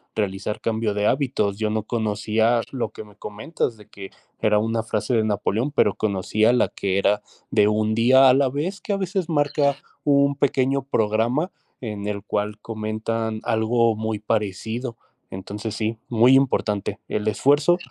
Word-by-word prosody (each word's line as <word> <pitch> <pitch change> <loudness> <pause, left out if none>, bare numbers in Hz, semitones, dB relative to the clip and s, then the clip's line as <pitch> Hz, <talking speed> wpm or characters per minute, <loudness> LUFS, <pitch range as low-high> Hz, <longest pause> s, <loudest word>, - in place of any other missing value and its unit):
realizar 105 +1 -2
cambio 110 -2 -1
de 105 0 +1
hábitos. 110 -8 0
Yo 110 0 -1
no 110 0 -1
conocía 110 +1 +1
lo 130 -3 -2
que - - -9
me 105 -1 -18
comentas 110 +4 -4
de 105 - -16
que 95 -1 -10 0.3
era 105 -1 +3
una 115 +1 -1
frase 115 +2 -2
de 110 - +3
Napoleón, 110 +5 -1
pero 105 -8 +2
conocía 110 +2 +1
la 125 - +3
que 95 -1 -2
era 105 +1 +2 0.3
de 105 -2 +4
1 105 +1 +1
día 130 +4 +6
a - - +6
la 135 0 +3
vez, 160 +9 -3
que 205 - -2
a - - 0
veces 190 -2 -2
marca 145 -2 +1 0.3
un 140 -1 +3
pequeño 135 0 +1
programa 120 - 0 0.3
en 105 -4 -5
el 100 -1 -3
cual 105 0 -2
comentan 110 +1 -3
algo 115 0 +2
muy 110 0 -3
parecido. 110 +3 -2 0.3
Entonces 105 +3 -6
sí, 110 +1 -2
muy 120 +2 +5
importante. 110 -7 +1
El 105 0 -2
esfuerzo 145 +9 +3
110 Hz, 165 wpm, -23 LUFS, 105-130 Hz, 0.3 s, día